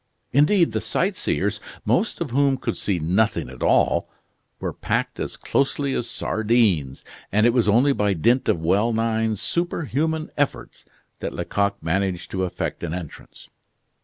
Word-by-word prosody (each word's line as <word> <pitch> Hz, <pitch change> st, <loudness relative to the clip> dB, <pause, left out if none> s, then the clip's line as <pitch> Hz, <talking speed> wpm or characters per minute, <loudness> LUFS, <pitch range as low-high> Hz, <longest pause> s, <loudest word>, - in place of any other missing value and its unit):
Indeed, 165 Hz, +6 st, +4 dB
the -, -, -1 dB
sightseers, 190 Hz, +2 st, -1 dB, 0.3 s
most 215 Hz, -, +1 dB
of 155 Hz, -7 st, -2 dB
whom 140 Hz, +1 st, +3 dB
could -, -, -3 dB
see 100 Hz, -3 st, -1 dB
nothing 90 Hz, -, 0 dB
at 65 Hz, -, -12 dB
all, -, -, +2 dB, 0.5 s
were -, -, -3 dB
packed -, -, -2 dB
as -, -, -4 dB
closely 140 Hz, 0 st, 0 dB
as 120 Hz, -, -2 dB
sardines, 105 Hz, -, +1 dB, 0.3 s
and 105 Hz, +2 st, +3 dB
it 120 Hz, -, +4 dB
was 120 Hz, -4 st, +2 dB
only 125 Hz, +7 st, +4 dB
by 105 Hz, -5 st, +1 dB
dint 120 Hz, +10 st, +2 dB
of -, -, +2 dB
well 100 Hz, +7 st, +2 dB
nigh 110 Hz, -1 st, 0 dB
superhuman 160 Hz, -, -1 dB
efforts 145 Hz, -1 st, -2 dB, 0.3 s
that -, -, -4 dB
Lecoq 100 Hz, -2 st, -1 dB
managed 90 Hz, +2 st, -1 dB
to 95 Hz, -1 st, -1 dB
effect 90 Hz, -, -4 dB
an 85 Hz, -1 st, -3 dB
entrance. 85 Hz, -5 st, -10 dB
110 Hz, 150 wpm, -23 LUFS, 95-140 Hz, 0.5 s, Indeed